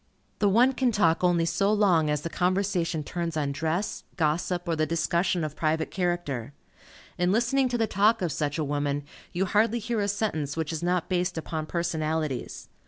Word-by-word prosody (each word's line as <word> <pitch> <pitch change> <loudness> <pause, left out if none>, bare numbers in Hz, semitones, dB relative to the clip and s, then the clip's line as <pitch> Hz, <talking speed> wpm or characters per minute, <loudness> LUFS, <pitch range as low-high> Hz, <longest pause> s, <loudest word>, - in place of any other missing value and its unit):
The 205 - +3
one 245 +6 +4
can 255 -2 +1
talk 170 -6 +2
only 175 -2 +3
so 195 +4 +1
long 185 -7 +3
as 150 -1 0
the 165 - -3
conversation 180 -3 0
turns 170 0 -3
on 145 -2 0
dress, 160 +7 -2
gossip, 175 +3 0
or 165 - +1
the 155 0 0
discussion 170 +1 0
of 155 -1 -4
private 160 0 0
character. 175 - -2 0.7
In 180 +1 +2
listening 245 +5 +2
to 240 - 0
the 225 - +2
talk 215 +1 +2
of 170 - 0
such 145 +1 -2
a 155 - 0
woman, 145 0 -1 0.3
you 185 +2 0
hardly 215 +5 +2
hear 235 0 -2
a 200 - 0
sentence 175 -9 -2
which 160 0 -2
is 160 - -3
not 175 0 0
based 180 -1 -1
upon 160 -1 -4
personalities. 155 -5 -2
175 Hz, 185 wpm, -27 LUFS, 155-200 Hz, 0.7 s, one